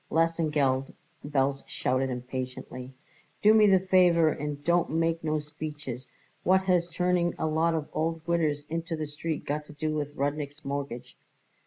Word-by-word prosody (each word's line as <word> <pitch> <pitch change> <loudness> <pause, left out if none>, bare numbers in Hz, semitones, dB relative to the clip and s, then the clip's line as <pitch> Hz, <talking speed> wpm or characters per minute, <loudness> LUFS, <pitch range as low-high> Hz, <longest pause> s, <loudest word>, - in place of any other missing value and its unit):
"Lesengeld," 150 -5 +1 0.3
Belz 140 -1 0
shouted 130 +1 0
impatiently, 125 0 -5 0.5
"do 210 +1 +7
me 215 -1 +6
the 190 -2 +6
favour 180 -3 +4
and 150 -1 -4
don't 170 +2 +2
make 165 +1 0
no 155 -1 +1
speeches. 150 -4 -6 0.4
What 190 +1 +4
has 180 -2 +2
turning 175 0 +1
a - - -1
lot 160 +1 +2
of 155 -2 -2
old 165 0 -1
widders 155 -4 +1
into 165 +1 -3
the 155 -1 -3
street 150 +2 -4
got 150 +1 -2
to 150 - -12
do 155 +1 -2
with 145 -1 -3
Rudnik's 145 +1 -3
mortgage?" 140 -3 -4
155 Hz, 155 wpm, -28 LUFS, 140-165 Hz, 0.5 s, do